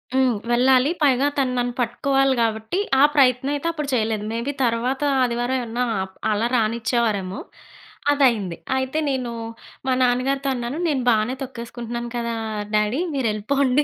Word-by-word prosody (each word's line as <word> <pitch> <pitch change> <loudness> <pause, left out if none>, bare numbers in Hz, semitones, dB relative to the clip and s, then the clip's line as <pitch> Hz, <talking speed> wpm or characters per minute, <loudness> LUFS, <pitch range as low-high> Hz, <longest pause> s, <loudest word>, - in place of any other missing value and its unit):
హ్మ్. 255 -4 +3
వెళ్ళాలి. 255 +3 +4
పైగా 275 -1 +4
తను 260 -2 +1
నన్ను 245 0 0
పట్టుకోవాలి 270 +3 +1
కాబట్టి 220 - -1 0.2
ఆ - - +8
ప్రయత్నం 265 0 +3
అయితే 290 +4 -3
అప్పుడు 300 -3 -4
చేయలేదు. 220 -3 0
మేబీ 235 +5 -2
తర్వాత 245 +4 0 0.2
ఆదివారం 245 +1 0
ఏవన్నా 240 +1 -2 0.2
అప్ 190 0 -11 0.2
అలా 215 +2 +1
రానిచ్చేవారేమో. 220 -4 0 0.7
అదయింది. 235 -11 +2 0.2
అయితే 265 +4 -1
నేనూ, 255 -3 -2 0.6
మా - - +2
నాన్నగారితో 265 +3 +1
అన్నాను 245 +3 -4
నేను 280 -5 0
బానే 220 +1 +2
తొక్కేసుకుంటున్నాను 235 -1 -6
కదా! 235 0 -2 0.4
డ్యాడీ 210 +6 +1
మీరెళ్ళిపోండి 260 +3 +1
245 Hz, 135 wpm, -22 LUFS, 230-265 Hz, 0.7 s, ఆ